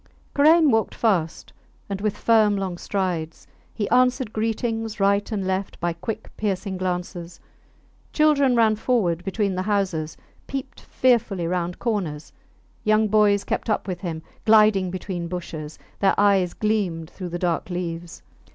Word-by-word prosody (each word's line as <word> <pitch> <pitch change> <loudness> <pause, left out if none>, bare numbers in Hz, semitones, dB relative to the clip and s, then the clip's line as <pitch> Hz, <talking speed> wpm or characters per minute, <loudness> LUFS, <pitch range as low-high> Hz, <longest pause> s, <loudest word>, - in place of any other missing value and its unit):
Karain 310 +1 +5
walked 225 -1 +1
fast, 180 -8 0 0.3
and 200 -1 -4
with 210 -1 -1
firm 215 -3 +3
long 190 -2 -3
strides; 175 -4 -3 0.3
he 205 - -3
answered 250 -2 +2
greetings 225 0 -2
right 200 +2 +2
and 200 -3 -2
left 190 +1 -2
by 175 0 -1
quick 215 +6 -6
piercing 195 -2 -2
glances. 180 -2 -4 0.7
Children 285 -4 +3
ran 225 -2 +4
forward 195 -8 0
between 200 +1 -1
the 185 - -2
houses, 185 -6 -1 0.3
peeped 265 -1 -6
fearfully 225 -8 +1
round 175 0 -2
corners; 185 -11 -3 0.5
young 215 0 +3
boys 205 -1 +4
kept - - -3
up 210 - 0
with 185 -2 -3
him, 165 -4 -4 0.2
gliding 215 -4 +5
between 180 -1 -4
bushes: 160 -3 -6 0.2
their 195 - +2
eyes 195 -3 +3
gleamed 195 -7 -1
through 185 -2 -7
the 175 - -3
dark 175 0 -1
leaves. 175 -1 -5
195 Hz, 140 wpm, -23 LUFS, 175-220 Hz, 0.7 s, Karain